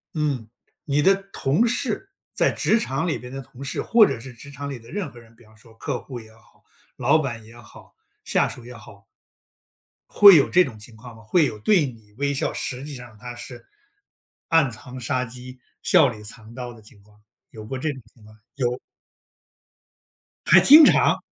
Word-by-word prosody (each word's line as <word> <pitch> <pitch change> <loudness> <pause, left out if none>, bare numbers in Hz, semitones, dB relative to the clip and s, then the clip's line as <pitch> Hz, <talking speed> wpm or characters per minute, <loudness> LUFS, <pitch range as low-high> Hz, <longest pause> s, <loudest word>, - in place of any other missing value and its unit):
嗯， 140 -8 -2 0.4
你 145 0 +1
的 195 +6 +5 0.2
同 155 - +1
事， 255 - -2 0.2
在 - - +2
职 225 - +1
场 135 -1 -2
里 165 - -1
边 125 0 -10
的 135 +1 -6
同 130 +1 -13
事， 135 - -3
或 230 -2 +5
者 - - -4
是 130 +2 -11
职 120 +4 -13
场 140 0 -7
里 135 -3 -6
的 115 +1 -17
任 190 -8 -4
何 120 - -14
人， 115 -1 -19
比 120 - -21
方 110 0 -22
说 115 +1 -20
客 125 +2 -4
户 125 -3 -8
也 110 -1 -15
好、 110 - -26 0.3
老 160 - +3
板 120 -7 -4
也 115 +2 -15
好、 120 - -17 0.3
下 - - +2
属 120 - -9
也 125 - -10
好 105 -3 -15 1.0
会 200 -3 +9
有 140 - +4
这 180 - +5
种 115 -5 -9
情 110 +2 -10
况 115 +1 -13
吗？ 115 - -15
会 155 +9 +2
有 110 -6 -5
对 170 - +3
你 110 -5 -11
微 140 0 -1
笑， 135 - -1
实 125 +1 -5
际 145 0 -7
上 125 -2 -12
它 120 +2 -8
是 120 0 -11 0.8
暗 160 -6 +3
藏 125 +3 -10
杀 125 +1 -1
机、 125 +1 -10 0.2
笑 170 -7 +5
里 105 -3 -10
藏 110 +1 -9
刀 125 -1 -7
的 115 - -16
情 105 -1 -19
况， 105 0 -25 0.3
有 110 - -10
过 130 +5 -6
这 155 +4 -2
种 130 -3 -10
情 115 - -22
况？ 110 0 -17 0.2
有。 125 -3 -1 1.7
还 - - +7
经 305 +3 +9
常。 - - +4
125 Hz, 215 characters per minute, -23 LUFS, 115-145 Hz, 1.7 s, 会